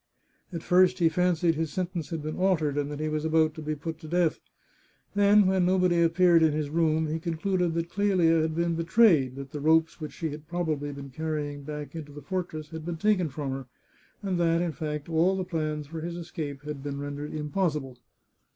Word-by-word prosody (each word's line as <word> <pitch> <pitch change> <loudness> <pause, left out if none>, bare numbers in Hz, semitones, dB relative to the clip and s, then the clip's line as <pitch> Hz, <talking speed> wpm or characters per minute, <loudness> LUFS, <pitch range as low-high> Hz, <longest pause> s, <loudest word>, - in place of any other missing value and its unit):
At 170 -2 -5
first 185 +1 +4
he 170 -3 +4
fancied 175 0 +2
his 160 -1 -2
sentence 175 -4 -3
had 160 -3 -4
been 155 +1 -4
altered, 165 -7 +2
and 145 -1 -1
that 145 0 -5
he 155 - -1
was 155 0 -2
about 160 -1 +3
to 160 - -8
be 155 0 -2
put 160 +2 -6
to 160 - -10
death. 170 0 +1 0.7
Then, 205 0 +5
when 190 -1 +3
nobody 180 -1 +3
appeared 170 0 +5
in 160 -2 +4
his 150 -1 -2
room, 160 -1 +2
he 155 +1 -2
concluded 170 +1 -1
that 170 0 -2
Clelia 180 -5 +3
had 160 0 -1
been 170 0 +1
betrayed, 165 - +4
that 135 0 -8
the 150 - -5
ropes 160 +2 +3
which 155 - -6
she 160 -3 -3
had 150 +1 -9
probably 160 -4 -2
been 140 -1 -9
conveying 150 0 -3
back 150 0 -7
into 150 -3 -8
the 145 -1 -10
fortress 160 -3 -4
had 160 -1 -6
been 170 0 -4
taken 185 -3 +2
from 140 0 -4
her, 135 -1 -5 0.6
and 185 -3 -1
that, 165 -1 +3
in 175 -1 0
fact, 150 -1 -4
all 170 +3 +2
the 185 - -1
plans 155 -4 -2
for 160 +2 -7
his 170 +1 -4
escape 150 -5 -6
had 150 -2 -6
been 140 0 -4
ren 145 0 -5
dered 145 +1 -5
impossible. 150 -4 -2
160 Hz, 215 wpm, -27 LUFS, 150-175 Hz, 0.7 s, Then